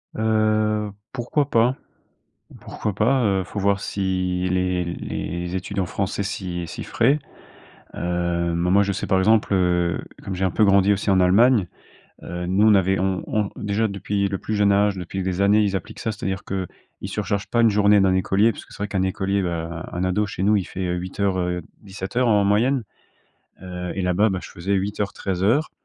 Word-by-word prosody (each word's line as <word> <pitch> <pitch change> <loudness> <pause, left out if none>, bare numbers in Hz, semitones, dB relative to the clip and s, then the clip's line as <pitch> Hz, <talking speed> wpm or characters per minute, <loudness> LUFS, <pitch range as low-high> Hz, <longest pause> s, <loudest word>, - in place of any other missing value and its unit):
Heu, 110 -1 +1 0.2
pourquoi 135 +3 -1
pas 120 +2 +3 0.9
pourquoi 105 - -4
pas? 120 +5 +2
Heu, 95 -2 +2
faut 95 +3 -7
voir 100 0 +1
si 90 -2 -1
les 90 -1 0
les 85 +1 -4
études 95 +2 -3
en 90 - 0
France 100 +2 -3
s'y 95 -3 -4
s'y - - -6
feraient. 135 +6 +2 0.8
Heu, 85 -1 -1
mais 85 +1 0
moi, 100 +2 +5
je 100 0 0
sais, - - -3
par 95 - +2
exemple, 105 +2 +3
heu, 90 -2 +1 0.2
comme 95 - -4
j'ai 95 +1 -1
un - - 0
peu 110 - +3
grandi 100 0 +4
aussi 100 +1 -1
en 95 -1 +4
Allemagne, 105 +3 +4 0.6
heu, 90 0 -5
nous, 95 +4 +3
on 110 - +6
avait 95 0 +2
on 95 0 0
on 105 -2 0
déjà 105 +2 0
depuis 100 0 -1
le 95 - -2
plus 110 - -4
jeune 105 -1 +3
âge, 100 0 +3
depuis 95 +1 -4
des 95 0 -1
années, 100 +2 +4
ils 100 -2 +1
appliquent 95 - -6
ça. 110 -3 -2
C'est-à-dire 95 -2 -4
que 95 -2 -3 0.3
ils 100 - -5
surchargent 100 0 -2
pas 120 - 0
une 115 - +6
journée 105 0 +4
d'un 95 -1 +3
écolier. 95 +4 +2
Parce - - -10
que - - -21
c'est - - -11
vrai 105 - -1
qu'un 95 -2 -1
écolier, 95 +1 0
bah, 85 -1 -4
un 90 +1 -2
ado 100 +3 +1
chez 95 -2 -4
nous, 105 +2 +4
il 100 - +1
fait, 95 +1 -5
heu 90 - -1
08:00, 95 +2 -2
heu, 90 -1 -1 0.2
17:00 105 +5 -2
en 105 -2 +4
moyenne. 120 +6 +2 0.8
Heu, 90 -1 -5
et 95 - -2
là-bas, 90 +4 +2
bah, 95 -1 -2
je - - -9
faisais 90 +4 -3
08:00 100 +1 -2
13:00. 100 - 0
95 Hz, 200 wpm, -23 LUFS, 90-105 Hz, 0.9 s, on